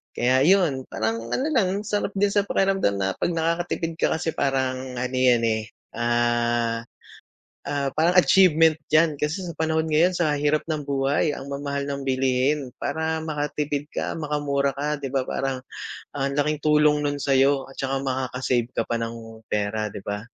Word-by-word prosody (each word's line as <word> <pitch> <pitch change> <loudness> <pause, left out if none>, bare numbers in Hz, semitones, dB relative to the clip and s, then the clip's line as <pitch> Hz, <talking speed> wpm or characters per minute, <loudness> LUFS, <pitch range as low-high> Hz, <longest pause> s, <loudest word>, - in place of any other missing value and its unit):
Kaya 130 +2 +3
yun, 170 -9 +3
parang 115 +1 -2
ano 265 - -1
lang. 200 -5 +1
sarap 205 -1 -2
din 200 +1 +2
sa 205 -1 +1
pakiramdam 195 - +1
na 95 -1 0
'pag 170 - 0
nakakatipid 165 0 -1
ka - - +2
kasi 160 0 -2
parang, 130 -2 -1
ano 125 +1 -3
yan 125 -2 +3
eh, 110 -1 0 0.2
ah, 120 0 +1 0.8
ah, 140 -2 -2
parang 175 +4 +3
achievement 165 -4 +5 0.2
'yan, 155 0 +4
kasi 175 +5 -1
sa 170 - -6
panahon 160 0 0
ngayon 160 +4 +3
sa 155 -4 +2
hirap 150 +2 0
ng 155 -2 -2
buhay, 140 +2 +1
ang 135 -1 -6
mamahal 140 0 -3
ng 140 -1 -4
bilihin. 130 +1 0
Para 160 0 -1
makatipid 150 -1 -2
ka, - - -3
makamura 145 -2 -1
ka, 150 +1 -2
'di 135 -1 -6
ba, 135 - +2
parang 130 0 -3 0.5
ang 140 -1 -1
laking 150 +1 0
tulong 150 -1 +4
nun 145 0 -1
sa'yo 135 0 +2
at 135 - -14
tsaka 135 0 -2
makaka-save 130 -2 -1
ka 115 - -2
pa 120 - -2
ng 115 -1 -6
pera, 105 +1 -1
'di 100 - -10
ba? 105 +1 -3
140 Hz, 170 wpm, -24 LUFS, 125-160 Hz, 0.8 s, achievement